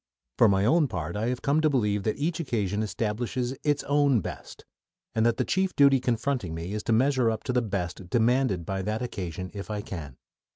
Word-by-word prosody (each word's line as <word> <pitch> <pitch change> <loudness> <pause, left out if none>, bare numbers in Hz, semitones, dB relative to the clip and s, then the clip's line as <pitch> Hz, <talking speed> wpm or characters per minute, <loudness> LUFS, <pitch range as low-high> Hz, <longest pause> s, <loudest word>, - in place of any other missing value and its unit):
For 115 - +7
my 100 0 +2
own 155 +5 +4
part, 85 -6 -4
I 110 +3 -1
have 125 0 -2
come 145 +3 +2
to 155 - +3
believe 105 -7 +1
that 110 - 0
each 160 +3 -1
occasion 105 - -1
establishes 120 +4 -2
its 145 -1 +1
own 140 -3 +3
"best," - - -8 0.5
and 110 - +1
that 115 - +1
the - - 0
chief 190 0 0
duty 140 -2 +6
confronting 120 -7 -1
me 85 +4 -5
is 105 - -2
to - - 0
measure 130 +1 +3
up 110 -1 -3
to 125 - -2
the 125 - +3
"best" 95 -4 -4
demanded 115 -6 +2
by 95 +2 -2
that 110 +5 -2
occasion 90 -6 -5
if 100 0 -7
I 105 -1 -2
can. 75 -10 -7
115 Hz, 210 wpm, -27 LUFS, 100-130 Hz, 0.5 s, For